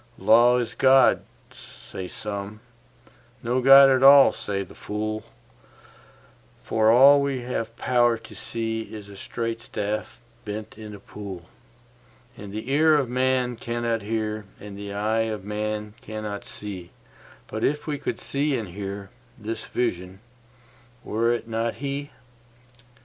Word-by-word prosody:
Law 120 +2 +5
is 120 -2 -2
God, 135 0 +5 0.3
say 95 - -9
some: 100 +1 -6 0.8
no 125 +2 0
God 135 +1 +9
at 130 -1 +3
all, 140 0 +8
says 100 -2 -4
the - - -14
fool; 110 +1 -4 1.4
For 110 0 +2
all 140 +4 +7
we 140 -2 -1
have 115 -2 -4
power 120 -2 +2
to 115 -1 -14
see 115 +2 -3
is 105 -2 -9
a 100 - -11
straight 115 +3 -4
staff 105 -2 -4 0.2
bent 105 0 -6
in 105 -1 -9
a - - -12
pool; 95 -4 -9 0.9
And 105 -3 -9
the 110 +5 -5
ear 155 +2 +5
of 140 -5 +1
man 125 -1 +1
cannot 120 -1 -2
hear, 110 0 -3
and 105 -1 -9
the 100 0 -7
eye 110 +2 0
of 105 -3 -5
man 105 0 -3
cannot 110 -2 -6
see; 95 -4 -8 0.6
But 110 - -5
if 150 +1 0
we 145 -2 -3
could 125 -4 -3
see 140 0 -1
and 110 -5 -5
hear, 100 +1 -7 0.3
this 110 0 -5
Vision—were 120 +3 -4
it 120 -1 -2
not 115 0 -2
He? 140 +2 -4
115 Hz, 140 wpm, -25 LUFS, 105-125 Hz, 1.4 s, God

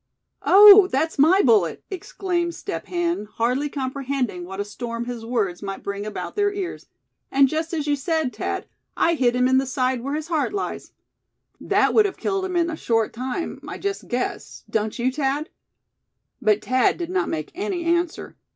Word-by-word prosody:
"Oh! 410 0 +9
that's 310 +3 -1
my 360 +8 +5
bullet!" 205 - +3
exclaimed 350 -2 -2
Step - - -6
Hen, 345 - -1
hardly 250 +6 0
comprehending 260 -8 -3
what 190 +2 -8
a 205 - -1
storm 235 +2 -5
his 240 -2 -6
words 220 -7 -1
might 195 -1 -6
bring 200 +1 -4
about 215 - -6
their 410 -1 +2
ears; 395 -3 -5 0.4
"and 275 0 +5
just 320 +3 -2
as 315 -4 -2
you 290 -1 +2
said, 310 -1 -1
Thad, - - -3 0.3
I 335 - +3
hit 250 -6 +2
him 250 0 +3
in 260 0 +4
the 270 - -2
side 255 -1 0
where 275 +4 -3
his 310 +1 -5
heart 320 +1 0
lies. 400 - -4 0.7
That - - +2
would 430 -2 +5
have 385 - -7
killed 390 -1 -1
him 370 -1 -4
in 340 -1 +1
a - - -4
short 225 -7 0
time, 255 +7 -4
I - - -6
just 400 0 -4
guess, 250 0 -4
don't 215 -1 -2
you, 250 +1 +1
Thad?" 285 +4 -1 0.9
But 215 -3 +2
Thad 255 0 +2
did 345 0 -4
not 375 0 0
make 155 -1 -4
any 375 -1 -3
answer. 340 0 -1
275 Hz, 185 wpm, -23 LUFS, 240-345 Hz, 0.9 s, Oh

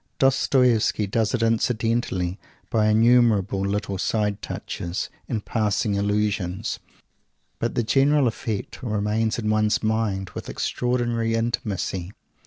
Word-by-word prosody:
Dostoievsky 125 -5 +3
does 110 +4 0
it 115 - -1
incidentally, 115 -5 0 0.3
by 110 -2 +3
innumerable 110 -3 +4
little 100 0 -2
side 105 -1 0
touches 85 +1 -4 0.2
and 110 -2 -2
passing 105 -1 0
allusions, 100 -1 -1 0.8
but 115 - -2
the 120 - +1
general 135 +5 +3
effect 110 -1 -4
remains 110 -1 0
in 110 -2 -3
one's 110 0 +2
mind 105 -4 -1
with - - -7
extraordinary 120 -2 -1
intimacy. 105 -5 -2
110 Hz, 110 wpm, -24 LUFS, 100-115 Hz, 0.8 s, innumerable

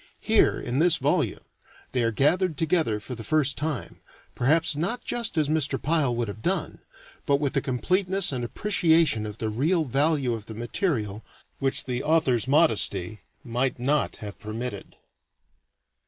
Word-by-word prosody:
Here, - - +3
in 125 +3 -2
this 165 0 +5
volume, 145 0 0 0.5
they 125 - 0
are 115 -1 +1
gathered 160 - +1
together 160 -9 +1
for 125 - -8
the 115 -2 -7
first 140 +3 +1
time, 150 -5 -4 0.3
perhaps 155 +5 +2
not 195 +11 -2
just 235 -7 -2
as 155 -2 +2
Mr. 145 -3 0
Pyle 145 -5 +1
would 120 -1 -1
have 100 +1 -7
done, - - -2 0.5
but 140 - +4
with 140 -2 -1
a 140 - +2
completeness 185 +9 0
and 125 -3 -3
appreciation 160 - +1
of 105 0 -8
the 110 - -2
real 155 +9 +1
value 140 -1 +1
of 110 -1 -6
the 110 - -8
material 115 - -2 0.4
which 135 -1 +1
the 125 -1 -3
author's 145 -7 +2
modesty 110 - +2 0.2
might 125 +3 0
not 140 +4 +1
have 105 -1 -8
permitted. 110 -1 -6
135 Hz, 155 wpm, -25 LUFS, 115-160 Hz, 0.5 s, this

